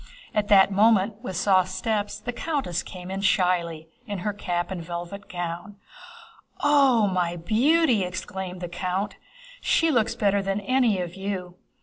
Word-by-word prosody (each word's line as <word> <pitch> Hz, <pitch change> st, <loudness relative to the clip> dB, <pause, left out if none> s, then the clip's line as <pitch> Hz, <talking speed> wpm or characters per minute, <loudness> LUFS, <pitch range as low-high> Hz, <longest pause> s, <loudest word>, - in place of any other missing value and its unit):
At 210 Hz, -1 st, 0 dB
that 200 Hz, -1 st, +6 dB
moment, 210 Hz, +1 st, +3 dB
with 190 Hz, -7 st, -5 dB
soft 185 Hz, 0 st, +3 dB
steps, 205 Hz, +2 st, -2 dB
the 245 Hz, -, -5 dB
countess 275 Hz, -, -2 dB
came 180 Hz, 0 st, -9 dB
in 195 Hz, +1 st, -3 dB
shyly, 175 Hz, -4 st, +1 dB, 0.2 s
in 205 Hz, -1 st, -3 dB
her 210 Hz, -, 0 dB
cap 175 Hz, -3 st, -3 dB
and 180 Hz, -3 st, -4 dB
velvet 175 Hz, +4 st, -7 dB
gown. 175 Hz, +3 st, -5 dB, 0.9 s
"Oo 275 Hz, -6 st, +5 dB
oo, -, -, +2 dB
my 180 Hz, -2 st, 0 dB
beauty!" 235 Hz, -, +3 dB
exclaimed 185 Hz, 0 st, -5 dB
the 175 Hz, -, -3 dB
count, 185 Hz, +3 st, -3 dB, 0.4 s
"she 330 Hz, -1 st, +3 dB
looks 235 Hz, -6 st, +1 dB
better 200 Hz, -1 st, +2 dB
than 195 Hz, +1 st, -1 dB
any 235 Hz, -2 st, +2 dB
of 175 Hz, -1 st, -4 dB
you!" 190 Hz, -2 st, -4 dB
195 Hz, 155 wpm, -25 LUFS, 180-215 Hz, 0.9 s, that